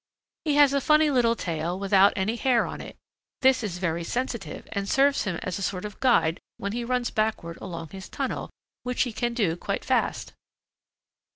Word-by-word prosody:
He 295 -2 +2
has 290 -2 +6
a 280 - +2
funny 305 +1 +4
little 235 -3 +3
tail 170 -2 -3
without 195 0 +5
any 205 +4 0
hair 245 -1 +2
on - - -6
it; - - -9 0.5
this 260 -1 +5
is 200 -6 -3
very 170 -2 -1
sensitive 235 -5 -4
and 200 -1 -3
serves 280 0 +3
him 190 -4 -1
as 185 +1 -3
a - - -6
sort 185 0 -2
of 210 - -8
guide 180 -10 +3 0.2
when 200 - -3
he 240 +2 -3
runs 250 0 -1
backward 215 -6 -1
along 165 -2 -6
his 190 -1 -9
tunnel, - - -3 0.3
which 250 0 0
he 245 - -4
can 240 +1 -1
do 195 -9 +1
quite - - -4
fast. - - 0
215 Hz, 190 wpm, -26 LUFS, 185-250 Hz, 0.5 s, has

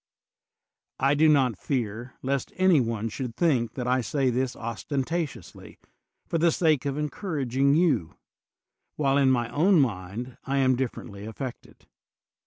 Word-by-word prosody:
I 135 +2 +3
do 155 +2 +4
not 130 -8 +3
fear 120 -2 -3
lest 135 0 -1
any 185 -4 +4
one 115 -2 -2
should 115 +1 -5
think 125 -10 +1
that 125 - -3
I 130 +1 +2
say 130 +2 0
this 125 +1 -1
ostentatiously 140 +7 -4 0.5
for 165 - -1
the 170 +1 +4
sake 155 -5 +2
of 140 - -2
encour 150 +1 -3
aging 135 +3 +2
you, 160 - +1 0.8
while 140 -1 +2
in 135 -1 +4
my 120 -3 +2
own 175 +4 +4
mind 115 0 -2
I 140 +1 -1
am 130 -1 +3
diflfer 130 -1 -3
ently 100 -1 -9
affected. 120 +3 -8
130 Hz, 150 wpm, -26 LUFS, 120-150 Hz, 0.8 s, do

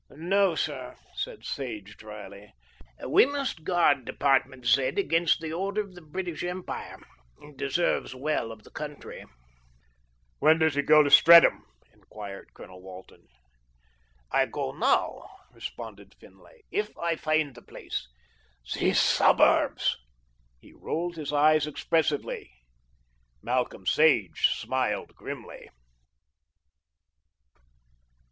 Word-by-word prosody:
"No, 180 +4 +1
sir," - - -4 0.2
said - - -6
Sage 110 -7 -6
drily, 105 -1 -11 0.5
"we - - +6
must 280 - -4
guard 170 -6 +2
Department 135 -1 0
Z. 125 +3 +4
against 170 -4 +2
the 160 -1 -5
Order 195 +4 -1
of 200 -3 -10
the 180 - -13
British 165 0 -5
Empire; 180 +1 -6 0.4
it 150 -1 -15
deserves 140 0 -1
well 135 -4 -2
of 110 -1 -12
the - - -17
country. 150 -1 -8 1.2
"When 155 +2 +5
does 160 -2 +2
he 145 - +1
go 150 +1 +6
to 145 - -1
Streatham?" 170 0 +7 0.3
enquired 100 -2 -10
Colonel 90 0 -13
Walton. 95 0 -13 1.0
"I 135 -1 +2
go 140 -2 -4
now," 230 - 0 0.2
responded - - -9
Finlay, - - -20
"if 415 +1 -3
I 170 -1 -1
find 155 -3 0
the 120 - -14
place. - - -7 0.7
These - - +2
suburbs!" - - +3 0.6
He - - -19
rolled 170 +1 -4
his 150 -3 -5
eyes 150 +1 +3
expressively. 155 - -1 0.9
Malcolm 125 -6 -2
Sage 140 - +3
smiled - - -2
grimly. - - -9
150 Hz, 110 wpm, -27 LUFS, 130-170 Hz, 1.2 s, Streatham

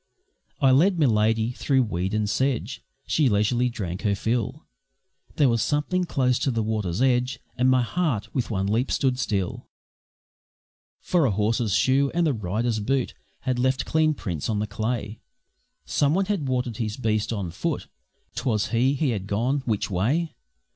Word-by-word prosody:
I 135 -2 +5
led 175 +8 +4
Miladi 110 -4 +2
through 135 -2 +2
weed 95 -2 -2
and 105 -1 0
sedge, 130 +3 -1 0.2
She 150 -5 +2
leisurely 120 +4 +2
drank 95 -6 -5
her 105 -2 +1
fill; 120 +7 -2 0.7
There 145 - +4
was 115 -2 +2
something 155 - 0
close 125 -6 +1
to - - 0
the 115 -3 0
water's 105 -1 -1
edge, 125 0 +1 0.2
And 130 +1 +3
my 130 -1 +4
heart 140 - -1
with 125 -3 -1
one 95 -3 -1
leap 115 +6 0
stood 130 -2 +1
still, 100 -7 -2 1.3
For 175 -5 +2
a - - +2
horse's 105 +1 +1
shoe 135 +2 +3
and 170 -1 +3
a 145 - +2
rider's 110 +2 -1
boot 130 +4 0 0.3
Had 125 -1 -1
left 130 +1 +1
clean 155 -1 +2
prints 85 - -4
on 110 - 0
the 105 - 0
clay; 110 +1 -3 0.7
Someone 155 +7 +2
had 190 -8 -1
watered 125 -3 -1
his 110 -2 -3
beast 110 -3 0
on 100 -6 -3
foot. 85 - -3 0.5
'Twas 110 -5 -1
he 125 +4 +2
he 140 -2 +1
had 100 -4 -3
gone. 120 +8 0
Which 105 -2 -1
way? 135 - 0
120 Hz, 165 wpm, -25 LUFS, 105-135 Hz, 1.3 s, I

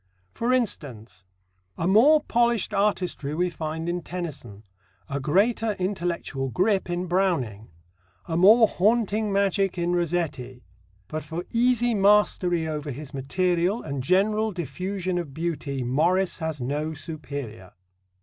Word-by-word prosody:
For 235 +2 -1
instance: 125 - -3 0.5
A 165 - -1
more 270 +11 +6
polished 235 -4 +1
artistry 185 -8 0
we 180 +2 0
find 160 0 -4
in 175 +1 -2
Tennyson; 150 - -7 0.4
a 140 0 -3
greater 210 - +1
intellectual 175 -8 -3
grip 190 - +1
in 175 +1 -2
Browning; 165 - -1 0.6
a 165 - -3
more 215 +6 +7
haunting 215 +1 +1
magic 195 -1 +1
in 175 0 0
Rossetti; 155 -8 -2 0.4
but 155 0 -5
for 165 +4 -5
easy 240 0 +2
mastery 195 -5 +3
over 150 -1 -4
his 140 +2 -7
material 180 - 0
and 140 -3 -4
general 210 +8 +2
diffusion 185 +2 -3
of 150 -6 -7
beauty 155 -5 -3
Morris 175 +11 +1
has 160 -3 -3
no 150 +5 -2
superior. 140 - -7
175 Hz, 125 wpm, -25 LUFS, 145-200 Hz, 0.6 s, more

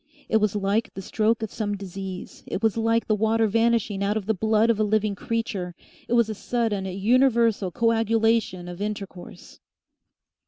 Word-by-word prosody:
It 220 - +3
was 210 -1 +1
like 205 +2 0
the 195 - -5
stroke 220 +3 0
of 220 - -4
some 205 -2 -2
disease 190 -1 -7
it 205 - -4
was 220 -2 +2
like 230 0 +1
the 215 - +1
water 220 +1 +2
vanishing 225 -2 +1
out 205 +2 +1
of 210 - -4
the 220 - +1
blood 220 +3 +2
of 220 - -2
a - - +3
living 215 0 +1
creature; 200 -5 -3 0.3
it - - -2
was 235 -2 +4
a 220 - -3
sudden, 215 -2 -1
universal 225 +1 +2
coagulation 225 -3 +1
of 175 +2 -8
intercourse.... 200 -4 -7
215 Hz, 170 wpm, -25 LUFS, 195-225 Hz, 0.3 s, was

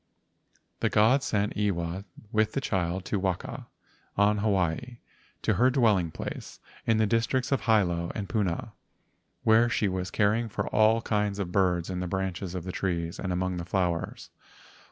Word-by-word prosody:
The - - +1
gods 125 +6 +4
sent 105 -1 0
Iwa 95 -2 -1 0.3
with 110 0 +2
the - - 0
child 95 -6 -1
to 100 - -1
Waka, 95 -2 -3 0.5
on 105 +1 +4
Hawaii, 100 +3 0 0.5
to - - +2
her 125 +2 +4
dwelling 110 -10 +3
place - - -7 0.3
in 115 - +4
the 110 - +3
districts 115 +4 0
of 135 -5 +2
Hilo 90 -7 +2
and 100 -2 -3
Puna 95 -6 -1 0.7
where 115 +2 +5
she 110 -3 +1
was 95 -1 -2
caring 110 +3 +1
for - - -3
all 110 +2 +4
kinds 105 -2 0
of 95 -3 -3
birds 90 -2 +1
in 90 - -3
the 90 - -2
branches 95 0 -3
of 90 - -4
the 90 - -4
trees 85 -1 -2
and 95 - -2
among 90 0 -1
the 85 - -3
flowers. 90 -1 -2
100 Hz, 165 wpm, -28 LUFS, 90-110 Hz, 0.7 s, where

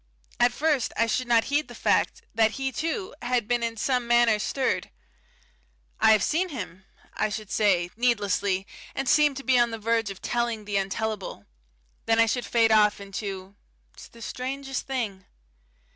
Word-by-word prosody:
At 240 0 +5
first 290 0 0
I 230 - +4
should 250 +2 -1
not 230 -1 +4
heed 290 +2 0
the - - -11
fact - - +1
that 220 -1 +3
he, 270 -1 -2
too, 330 - -3
had 240 -3 0
been 240 0 +1
in 230 -1 -2
some 250 +1 0
manner 235 -2 +4
stirred. 265 +4 -1 1.1
"I 220 - +6
have 215 - +3
seen 360 +4 +1
him," 190 - -7 0.3
I - - 0
should 215 -1 -6
say, 180 -5 +2
needlessly, 205 -5 +1 0.3
and 270 - -2
seem 295 +2 +4
to 275 - -6
be 260 -2 +3
on 240 0 +3
the 225 - -5
verge 225 0 0
of 195 -1 -8
telling 235 -3 -2
the 205 -1 -1
untellable. 195 - -3 0.6
Then 225 0 +3
I 230 - +6
should 245 +2 -2
fade 225 -1 +3
off 210 -1 +4
into: 195 -1 -6 0.4
"It's - - -12
the 230 -1 -13
strangest 270 +2 -4
thing." 225 -8 -3
230 Hz, 175 wpm, -26 LUFS, 210-255 Hz, 1.1 s, I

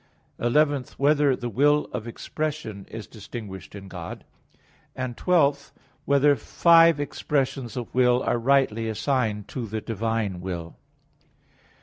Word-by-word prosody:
(11) 145 +2 +2
Whether 145 -1 +3
the 120 - -5
will 145 +6 +3
of 120 -2 -4
expression 140 -5 -5
is 110 -2 -7
distinguished 105 -3 -9
in 100 -1 -9
God? 90 -3 -8 0.7
(12) 140 +3 +1 0.3
Whether 140 +1 +4
five 165 +5 +5
expressions 135 -4 -2
of 120 - -5
will 125 0 +3
are 120 - 0
rightly 115 -3 +2
assigned 110 -3 -1
to 120 -4 -4
the 110 +2 -3
divine 110 -4 -2
will? 85 -2 -5
125 Hz, 115 wpm, -25 LUFS, 110-140 Hz, 0.7 s, five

